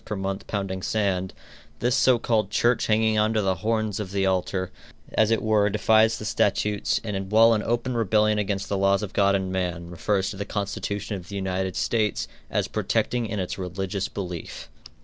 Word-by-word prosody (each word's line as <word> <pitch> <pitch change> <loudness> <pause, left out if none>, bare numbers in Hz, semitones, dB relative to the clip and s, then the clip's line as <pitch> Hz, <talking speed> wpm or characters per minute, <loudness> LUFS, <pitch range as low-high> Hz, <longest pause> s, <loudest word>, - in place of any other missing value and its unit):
per 105 - -4
month 95 0 -4
pounding 95 -2 -3
sand, 95 -3 0 0.5
this 120 +2 +1
so 130 -2 +4
called 110 -4 0
church 120 +3 +2
hanging 110 0 +3
on 110 +1 +2
to 110 - +2
the 95 -1 +2
horns 110 -2 0
of 105 -3 -4
the 100 -1 0
altar, 95 0 -1 0.4
as 110 -1 +3
it 115 - +1
were, 105 -2 +3
defies 110 +1 +3
the 110 - -7
statutes, 105 0 +1
and 95 -3 -4
while 115 +1 +6
in 110 - +1
open 120 +3 -1
rebellion 105 -1 +2
against 100 -1 -2
the 100 - -1
laws 100 +1 +3
of 105 - -6
God 100 -1 +3
and 95 -1 -2
man, 90 -2 -3
refers 95 +3 0
to 100 - -8
the 100 - -2
constitution 100 +1 -3
of 90 -2 -12
the 100 - -6
United 95 -1 -2
States 110 -4 0 0.2
as - - 0
protecting 120 -2 0
it 110 - -5
in 105 - -2
its 95 +1 -4
"religious 95 +2 -3
belief." 90 -4 -6
100 Hz, 195 wpm, -25 LUFS, 95-110 Hz, 0.5 s, while